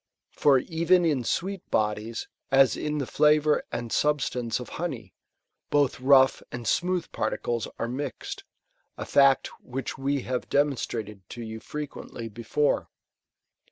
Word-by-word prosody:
For 140 -2 +4
even 170 +5 +2
in 145 -6 +1
sweet 190 - -2
bodies, 105 +1 -1 0.2
as 135 -3 +5
in 150 0 -2
the 140 - -1
fiavour 150 +2 +3
and 120 -1 -4
substance 125 -6 0
of 125 - -8
honey, 120 - -4 0.6
both 145 -2 +2
rougJi 130 0 +5
and 120 -1 -6
smooth 180 -1 0
particles 120 -2 -2
are 115 - -2
mixed; 130 +3 -5 0.5
a - - -5
fact 140 -1 +4
which 130 +1 -5
we 140 0 0
have 125 -1 -3
de - - +1
monstrated 115 -7 -4
to 120 - -7
you 110 0 -6
frequently 140 -5 -7
before. 115 +7 0
135 Hz, 135 wpm, -27 LUFS, 120-150 Hz, 0.6 s, as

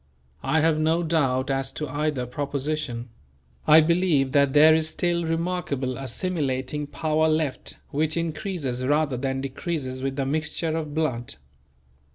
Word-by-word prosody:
I 160 - +2
have 160 -1 +3
no 160 +2 +2
doubt 140 -5 +1
as 135 0 0
to 150 - -4
either 145 -1 -1
proposition; 140 -2 -3 0.6
I 155 +1 +8
believe 160 -5 +2
that 140 -1 +3
there 155 +2 +7
is 155 0 +2
still 170 +1 0
remarkable 165 -6 -2
assimilating 135 0 -2
power 155 +2 +1
left 155 -4 -1
which 155 +2 0
increases 160 - -3
rather 145 0 +1
than 135 +1 -2
decreases 135 -1 -4
with 135 0 -2
the 135 -1 -1
mixture 155 +3 -1
of 155 -2 -4
blood. 130 -7 -1
150 Hz, 140 wpm, -25 LUFS, 135-160 Hz, 0.6 s, I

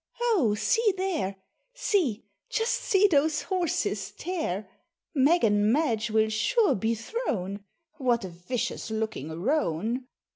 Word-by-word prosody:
Oh, 240 - +3
see 450 - +2
there, 340 - -1 0.4
See 360 - 0 0.2
just 450 0 0
see 390 0 +3
those 310 -4 +3
horses 365 -4 -1
tear! 310 - -3 0.5
Meg 305 +4 +4
and 205 -1 +3
Madge 235 -6 +1
will 220 0 +2
sure 420 - +2
be 220 +4 0
thrown. 210 - -3 0.3
What 245 -6 +1
a - - -5
vicious 180 +8 -4
looking 220 -9 -3
roan! 235 - 0
245 Hz, 120 wpm, -27 LUFS, 215-355 Hz, 0.5 s, Meg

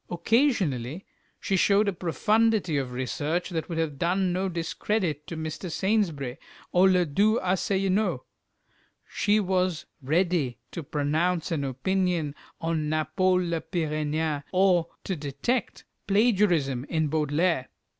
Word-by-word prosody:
Occasionally 175 - +1 0.3
she 195 - -1
showed 200 +3 +3
a 200 - +1
profundity 210 +1 +1
of 135 -3 -1
research 145 +8 -2
that 165 0 -3
would 165 - -3
have 155 -4 -2
done 180 +1 +1
no 190 +1 -1
discredit 170 -2 -2
to 165 - -6
Mr. 160 +3 -5
Saintsbury 165 - 0 0.3
or 185 +2 +5
"le 180 -1 +3
doux 205 +9 +2
Assellineau." 190 +2 0 0.8
She 210 +1 +2
was 185 -4 0 0.2
ready 160 -2 +1
to 170 - -5
pronounce 155 +5 -1
an 155 -4 -1
opinion 165 +3 -1 0.3
on 160 -2 -1
Napol 180 +4 +1
le 165 -1 -1
Pyrénéan 155 -2 -1
or 185 -3 +3 0.2
to 190 - -2
detect 150 - -2
a - - -28 0.2
plagiarism 190 - +2
in 160 0 0
Baudelaire. 155 0 0
170 Hz, 125 wpm, -26 LUFS, 150-190 Hz, 0.8 s, or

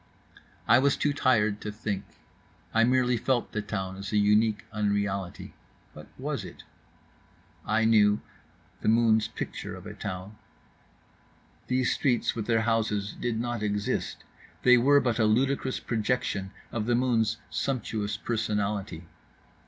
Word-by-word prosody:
I 120 +3 +7
was 140 +1 +2
too 145 - +1
tired 110 -7 +2
to 105 - -4
think. 105 -2 -3 0.7
I 115 - +4
merely 125 0 +3
felt 125 +1 0
the 105 - -2
town 95 -2 -4
as 100 0 -6
a 105 - +2
unique 105 +1 +3
unreality. 100 -3 -2 0.4
What - - -11
was - - -3
it? - - -11 1.0
I 110 +1 +2
knew—the 105 -2 0
moon's 110 -1 +4
picture - - -6
of - - -11
a - - -7
town. 95 +2 -6 1.3
These 125 -1 +1
streets 125 -4 +1
with 110 -3 -4
their 115 -1 +3
houses 110 -3 0
did 115 -2 -2
not 120 -1 -2
exist, 105 -1 -2 0.4
they 125 0 +7
were 140 +4 +5
but 120 -2 0
a 110 - +4
ludicrous 130 +4 +1
projection 110 -4 -1 0.2
of 110 -2 -2
the 120 - +3
moon's 115 -3 +1
sumptuous 110 -6 -2
personality. 105 -6 -2
110 Hz, 135 wpm, -28 LUFS, 105-120 Hz, 1.3 s, I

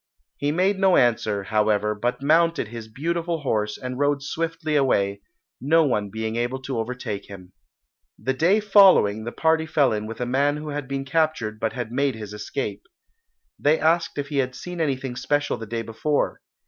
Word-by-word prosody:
He 145 +1 0
made 190 +4 +1
no 190 -2 +4
answer, 110 -4 +2
however, 105 0 +1
but 120 +5 -2
mounted 165 -4 +3
his 115 -1 -8
beautiful 165 +6 -2
horse 105 -6 -1
and 125 0 -6
rode 145 -1 +1
swiftly 165 +1 -2
away, 100 -8 +1 0.4
no 160 +5 +4
one 105 -7 0
being 110 +2 -3
able 120 +3 -1
to 130 -3 -3
overtake 115 -3 -4
him. 90 -2 -11 0.6
The 130 - -1
day 175 +10 +3
following 190 - +5
the 120 - -4
party 160 +2 +1
fell 145 -6 +2
in 105 0 -3
with 115 0 -7
a 125 - -1
man 140 +4 +1
who 150 0 -6
had 145 -2 -4
been 135 0 -3
captured 135 -8 0
but 110 -1 -1
had 120 -3 -5
made 135 0 0
his 105 -2 -8
escape. 105 +6 -4 0.8
They 150 +2 +3
asked 165 +2 +1
if 145 -1 -3
he 145 - -3
had 130 -2 0
seen 180 +4 -6
anything 135 -4 -2
special 145 +1 0
the 115 -1 -8
day 115 +1 -3
before. 115 +7 -1
135 Hz, 185 wpm, -24 LUFS, 110-155 Hz, 0.8 s, following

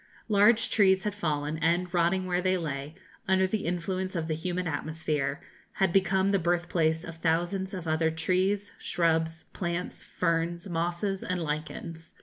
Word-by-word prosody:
Large 215 +2 +4
trees 190 -3 +4
had 210 - -1
fallen, 155 -5 -2
and, 175 +2 +1
rotting 180 +2 +2
where 180 0 0
they 185 0 +2
lay, 145 -2 -4 0.3
under 190 0 +4
the 195 -1 -2
influence 185 +2 -2
of 165 -2 -1
the 160 - 0
humid 180 +3 -2
atmosphere, 155 -2 -2 0.3
had 190 -3 +1
become 190 0 +3
the 200 -1 +3
birthplace 170 -2 +1
of 165 0 -8
thousands 175 +4 0
of 180 -4 -6
other 160 +1 +2
trees, 185 +5 0
shrubs, 165 -1 0
plants, 175 0 -3
ferns, 170 +1 -1
mosses, 175 +3 -1
and 185 -1 -2
lichens. 160 +2 -5
175 Hz, 150 wpm, -28 LUFS, 160-190 Hz, 0.3 s, Large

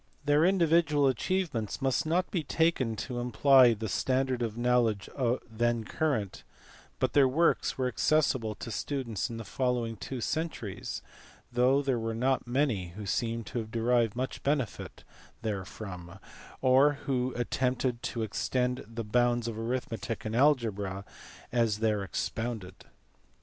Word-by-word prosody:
Their 145 +1 +4
individual 165 -5 +3
achievements 130 - -1
must 135 +2 0
not 180 +3 +1
be 175 - 0
taken 150 -6 +1
to 125 -2 -4
imply 125 0 +5
the 110 +1 -4
standard 130 +4 0
of 115 -1 -2
knowledge 120 -4 +2 0.4
then 120 0 0
current, 110 -7 -2 0.5
but - - 0
their 140 -2 +6
works 160 +6 +2
were 130 -1 +1
accessible 125 -3 +1
to 115 - -7
students 120 -8 -2
in 115 - -6
the 115 - -5
following 120 +2 -1
two 130 +4 -6
centuries 120 - -3 0.5
though 130 +3 +3
there 130 -4 0
were 115 0 -3
not 130 +1 0
many 120 -9 0
who 105 0 -6
seem 115 +3 -1
to 110 +4 -4
have 110 -1 -5
derived 115 -1 +1
much 130 +2 -3
benefit 140 -6 -2 0.4
therefrom 95 -4 -5 0.5
or 135 +3 +5
who 130 -2 0
attempted 125 0 -1
to 115 - -3
extend 125 +4 -1
the 115 +1 -5
bounds 120 +2 +1
of 115 - -3
arithmetic 115 -2 -3
and 110 +1 -2
algebra 110 -8 +1 0.5
as 115 -4 +2
there 105 -2 +1
expounded. 110 +1 -4
120 Hz, 140 wpm, -30 LUFS, 110-135 Hz, 0.5 s, their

